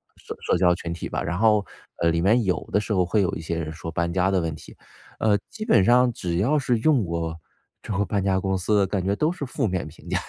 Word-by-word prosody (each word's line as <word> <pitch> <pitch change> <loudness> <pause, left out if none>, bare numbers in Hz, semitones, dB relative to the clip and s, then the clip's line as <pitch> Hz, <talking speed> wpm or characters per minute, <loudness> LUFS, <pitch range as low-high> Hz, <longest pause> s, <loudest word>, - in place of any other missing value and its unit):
社 - - -8
社 - - +1
交 90 0 +4
群 85 -1 -5
体 85 - -6
吧。 - - -2
然 85 +2 -2
后， 105 -1 +3 0.4
呃， 85 - +4
里 85 0 +1
面 110 +7 +4
有 90 -2 -1
的 - - +3
时 105 0 -3
候 90 -2 +2
会 100 +4 +1
有 90 - 0
一 - - -6
些 85 0 -3
人 80 -2 -4
说 80 +1 -7
搬 85 +1 -1
家 95 +1 +2
的 95 - +2
问 80 -2 -2
题。 - - -14 0.4
呃， 105 -2 +3
基 215 -1 -7
本 160 - +4
上 125 +3 +4
只 85 -5 -3
要 125 +11 +2
是 125 -5 +1
用 135 -1 +3
过 85 -2 -3 0.4
这 - - -7
个 105 - +1
搬 100 -2 -1
家 95 -1 +2
公 95 0 -1
司 105 +3 +1
的 100 -1 +3
感 95 -2 -2
觉 100 +2 +1
都 155 +9 +1
是 170 -4 -4
负 130 -1 -1
面 90 -2 -2
评 80 - -16
价， - - +1
95 Hz, 290 characters per minute, -24 LUFS, 85-110 Hz, 0.4 s, 交